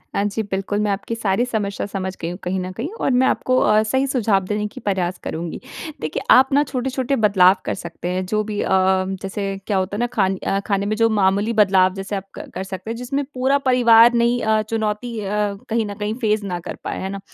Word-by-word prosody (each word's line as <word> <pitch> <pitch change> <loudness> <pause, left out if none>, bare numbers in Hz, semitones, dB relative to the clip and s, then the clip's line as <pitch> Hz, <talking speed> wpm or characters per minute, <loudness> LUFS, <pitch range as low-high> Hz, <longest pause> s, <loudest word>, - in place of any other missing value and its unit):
हाँ, 200 - +1
जी, 205 +2 -1
बिल्कुल, 195 +2 -1
मैं 210 -1 +1
आपकी 200 +3 -3
सारी 225 0 0
समस्या 210 -5 -2
समझ 190 -1 -4
गई 165 - -2
हूँ 180 - -6
कहीं 185 +1 -1
न 185 0 -4
कहीं 250 +8 -3
और - - +1
मैं 255 +1 +3
आपको 255 0 +1
अ, 215 +1 +4
सही 265 +5 0
सुझाव 215 -7 +1
देने 210 +1 -2
के 210 - -11
प्रयास 185 -3 -1
करूँगी। 165 0 -4 0.4
देखिए 155 0 -3
आप 265 +1 +7
ना 285 +1 +5
छोटे-छोटे 265 0 -2
बदलाव 195 -5 +5
कर - - -1
सकते 170 -1 -7
हैं 185 +1 -2
जो 215 +3 0
भी 210 -1 -4
अ, - - -2 0.5
जैसे 195 +1 -4 0.2
क्या 205 - +1
होता 190 +2 -1
है - - -3
ना 240 - +1
खान 195 -4 +2
अ, 195 - -1
खाने 200 -1 0
में 215 +1 0
जो 225 0 +3
मामूली 205 +1 +2
बदलाव 190 -3 +4
जैसे 195 +1 -5
अ, - - 0
आप 195 - -5 0.2
क - - -9
कर 190 - -3
सकते 190 +2 -7
हैं 230 - -3
जिसमें 275 +3 -2
पूरा 265 +2 +2
परिवार 240 -3 +6
नहीं 235 +1 +2 0.3
चुनौती 220 +1 -2
अ, 205 - -5 0.4
कहीं 225 -1 +1
न 205 - -5
कहीं 210 0 -2
फ़ेस 215 -1 +1
ना 180 -3 -3
कर - - -7
पाएँ, - - -4
है 190 - -3
ना? 195 0 -5
210 Hz, 235 wpm, -21 LUFS, 195-235 Hz, 0.5 s, आप